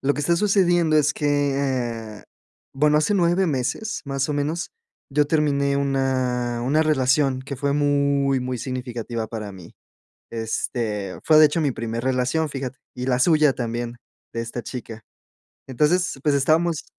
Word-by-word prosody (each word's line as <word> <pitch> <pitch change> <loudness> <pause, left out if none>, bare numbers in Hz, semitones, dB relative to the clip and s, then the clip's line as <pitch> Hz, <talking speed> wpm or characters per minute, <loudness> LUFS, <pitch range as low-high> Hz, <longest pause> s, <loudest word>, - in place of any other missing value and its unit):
lo 140 +1 +1
que - - -3
está 170 +4 +2
sucediendo 175 -4 +3
es 150 0 +3
que, 150 - -3 0.9
eh, - - -16 0.5
bueno, 150 +2 +3
hace 155 +6 +2
9 175 +1 +2
meses, 135 - -2
más 135 0 -1
o - - 0
menos, 150 +4 -2 0.4
yo 150 +1 +3
terminé 140 -2 +1
una 130 -3 0
una 145 +6 +2
relación, 135 -2 +2
que 140 +1 -6
fue 140 +2 0
muy, 140 -2 +2
muy 125 0 -3
significativa 120 -2 -4
para 110 -2 -6
mí, 90 -3 -13 0.6
este, 110 -3 -3
fue, 155 -1 +6
de 155 - +9
hecho, 150 +3 -1
mi 145 -3 +1
primer 115 0 -4
relación, 130 +5 0
fíjate, 135 -2 -5 0.2
y 125 0 -5
la 125 -1 +2
suya 150 0 +4
también, 120 0 -4 0.4
de 115 - -3
esta 115 +1 -5
chica, 115 -3 -7 0.7
entonces, 150 +5 +1
pues, 150 -1 +2
estábamos, 160 +3 +1
140 Hz, 155 wpm, -23 LUFS, 125-150 Hz, 0.9 s, de